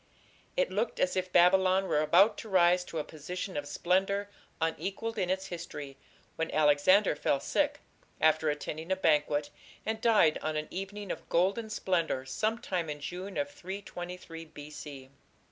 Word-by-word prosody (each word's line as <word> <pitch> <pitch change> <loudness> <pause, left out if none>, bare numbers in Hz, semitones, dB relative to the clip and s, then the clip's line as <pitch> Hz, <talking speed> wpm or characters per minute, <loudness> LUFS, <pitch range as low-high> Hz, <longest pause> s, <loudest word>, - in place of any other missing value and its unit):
It - - +2
looked - - -1
as 275 0 +1
if 185 0 -1
Babylon 185 +2 +5
were 150 - +2
about 200 +7 +5
to 220 - -8
rise 180 -1 +4
to 165 - -6
a 155 - 0
position 180 +6 -6
of 145 0 -3
splendour 195 +6 0 0.3
unequalled 195 +7 -2
in 180 -2 0
its 190 +1 -1
history, 150 -5 -7 0.4
when 165 0 -1
Alexander 155 +6 +4
fell 140 -1 +1
sick, - - 0 0.4
after 155 0 +3
attending 155 +3 -4
a - - +4
banquet, 150 -4 +2 0.3
and 220 0 -2
died 215 -10 +4
on 155 0 -2
an 150 - -3
evening 195 +1 -5
of - - -7
golden 195 +6 +1
splendour 170 -10 0
sometime 190 - -1
in 150 0 -4
June 185 +6 -6
of 285 0 -1
323 180 - -7
B. 150 -1 -11
180 Hz, 155 wpm, -30 LUFS, 155-195 Hz, 0.4 s, Babylon